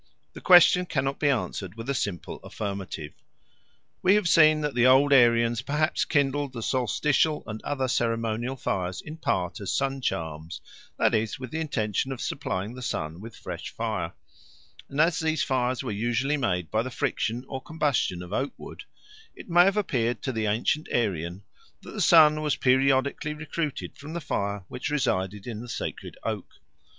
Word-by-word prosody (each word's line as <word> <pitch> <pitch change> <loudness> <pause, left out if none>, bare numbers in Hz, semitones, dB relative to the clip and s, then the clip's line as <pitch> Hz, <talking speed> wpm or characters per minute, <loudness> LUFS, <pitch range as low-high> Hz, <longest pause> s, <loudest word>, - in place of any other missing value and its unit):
The - - -10
question 180 0 +7
cannot 135 -2 -1
be 145 - +2
answered 105 -7 -2
with 115 +1 -8
a 140 - 0
simple 100 - -3
affirmative. 100 -7 -5 0.9
We 190 +2 +5
have 210 -4 +2
seen 155 -2 +6
that 150 -2 -1
the 125 +1 +4
old 140 +2 +6
Aryans 115 -2 +4
perhaps 150 +3 0
kindled 145 -2 0
the 115 -2 -5
solstitial 145 +6 +1
and 110 -1 -6
other 135 -2 -2
ceremonial 115 +1 -1
fires 90 -7 -2
in 155 +2 -9
part 90 - -1
as 100 - -3
sun 135 0 -1
charms, 80 -5 -3 0.4
that - - +3
is, 110 -1 0
with 130 -2 -7
the 160 - -3
intention 130 -5 -1
of 130 - -5
supplying 105 -6 -3
the 125 - -9
sun 80 -8 -3
with 115 +1 -10
fresh - - -7
fire; - - -3 0.8
and 140 - -5
as 165 +1 +3
these 160 0 0
fires 130 -1 0
were 125 - -3
usually 120 +7 0
made 90 - -1
by 110 - +2
the 130 - -4
friction 125 -2 -2
or 135 -1 -5
combustion 140 - -1
of 90 +2 -9
oak 135 +5 -1
wood, - - -10 0.5
it - - -12
may 175 +1 +7
have 195 +2 +2
appeared 120 - 0
to 130 - -1
the 110 -3 -1
ancient 115 +9 0
Aryan 95 -5 -1 0.4
that - - -10
the 210 - -4
sun 155 -2 +6
was 150 -2 +1
periodically 135 +3 +2
recruited 155 -1 -4
from 145 +3 -8
the 170 - -2
fire 100 - -3
which 125 - -4
resided 105 -9 -1
in 115 -3 -5
the 120 - -9
sacred - - -5
oak. - - -4
130 Hz, 175 wpm, -26 LUFS, 110-150 Hz, 0.9 s, question